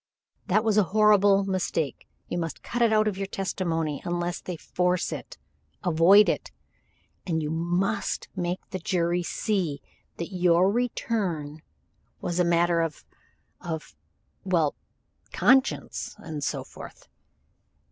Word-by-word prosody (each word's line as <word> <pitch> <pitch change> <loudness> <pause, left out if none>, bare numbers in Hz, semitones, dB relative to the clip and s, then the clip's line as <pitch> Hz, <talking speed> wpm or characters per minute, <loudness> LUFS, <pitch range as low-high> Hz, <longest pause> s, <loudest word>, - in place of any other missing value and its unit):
"That 215 +4 +3
was 220 -2 +2
a 210 - +6
horrible 205 -2 +5
mistake. 185 -6 -2 0.2
You 175 - -2
must 165 -2 -5
cut 240 - -3
it 230 -2 +4
out 215 0 +3
of 200 -2 -2
your 195 - -2
testimony 165 -6 -2
unless 175 0 -2
they 180 -2 -5
force 180 +2 0
it. - - -7 0.5
Avoid 180 +5 +6
it. - - -1 0.8
And 160 -3 0
you 150 - -2
must 175 +6 -1
make 180 0 -3
the 185 - -3
jury 175 0 0
see 175 -5 -1 0.4
that 170 +3 -5
your 180 +1 +4
return 195 -10 -2 0.6
was 175 0 -2
a - - +5
matter 170 0 +3
of 165 -3 -4 0.6
of 160 -3 -6 0.5
well, 170 -6 +2 0.6
conscience 265 +1 +2
and 155 -3 -6
so - - -2
forth." - - -12
180 Hz, 130 wpm, -26 LUFS, 165-200 Hz, 0.8 s, a